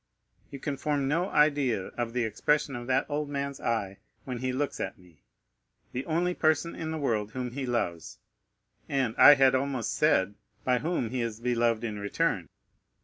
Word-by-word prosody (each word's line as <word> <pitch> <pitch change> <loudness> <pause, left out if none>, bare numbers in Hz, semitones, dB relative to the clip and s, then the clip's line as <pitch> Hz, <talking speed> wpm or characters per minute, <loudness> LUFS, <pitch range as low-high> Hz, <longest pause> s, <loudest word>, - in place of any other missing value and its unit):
You 140 - -7
can 140 0 -4
form 145 -2 0
no 170 +6 0
idea 140 -9 +2
of 120 -1 -4
the 125 -1 0
expression 140 +5 0
of 120 0 -6
that 130 0 +2
old 150 0 -2
man's 140 -1 -3
eye 100 -5 -2 0.3
when 125 -2 -4
he 130 +1 -1
looks 140 +2 -2
at - - -4
me, 90 -5 -21 0.7
the 130 +2 -4
only 175 +2 +1
person 160 0 +1
in 160 -1 -5
the 160 - -3
world 110 -7 -1
whom 125 -2 -3
he 130 +1 -4
loves, 85 -9 -2 0.7
and, 135 -5 0
I 145 - +10
had 135 -1 +5
almost 130 -3 -1
said, 105 -11 +2 0.3
by 125 -1 +2
whom 150 -7 -1
he 125 -1 -1
is 115 -2 -3
beloved 120 -1 +1
in 105 -3 -3
return. 100 - -1
130 Hz, 180 wpm, -28 LUFS, 115-145 Hz, 0.7 s, I